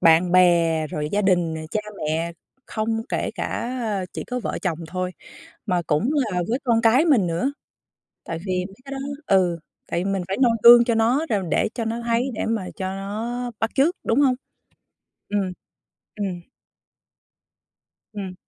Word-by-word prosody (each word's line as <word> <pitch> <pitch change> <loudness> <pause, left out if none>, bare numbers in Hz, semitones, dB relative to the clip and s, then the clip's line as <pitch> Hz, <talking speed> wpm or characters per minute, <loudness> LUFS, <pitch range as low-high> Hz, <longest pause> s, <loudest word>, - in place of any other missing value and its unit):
bạn 170 +2 +5
bè, 170 -3 +4
rồi 150 0 -3
gia 205 +1 +2
đình 175 -4 +2
nè, 160 - -5
cha 215 - 0 0.2
mẹ 160 +2 -1 0.3
không 225 0 -1
kể - - -1
cả 240 - -3 0.4
chỉ - - -5
có 250 0 -3
vợ - - -3
chồng 170 -4 -1
thôi 185 +1 -2 0.6
mà 180 -4 +1
cũng 160 - +1
là 215 -11 0
với 240 +3 +1
con 235 -3 +3
cái 245 +6 +5
mình 250 - +4
nữa, 170 +12 0 0.7
tại 165 - -4
vì 185 -1 -1
mấy 195 - -16
cái 275 - -9
đó - - -4 0.3
ừ, 185 -3 +3 0.3
tại - - +1
vì - - -5
mình 195 -2 -1
phải 195 - -2
noi 245 -3 +5
gương 240 0 +10
cho 235 -2 +1
nó 240 +7 +2
rồi 200 -3 +1
để - - +2
cho 235 -2 -2
nó 230 +1 -2
thấy 235 +3 +1
để - - -2
mà 220 -4 -1
cho 190 - -3
nó 230 +5 -4
bắt 225 - 0
chước, 300 +7 +3
đúng 225 - +2
hông? 260 -3 +4 0.9
Ừm, 200 -3 0 0.7
ừm. 195 -4 -3 1.7
Ừm. 195 -3 -6
205 Hz, 175 wpm, -23 LUFS, 180-235 Hz, 1.7 s, gương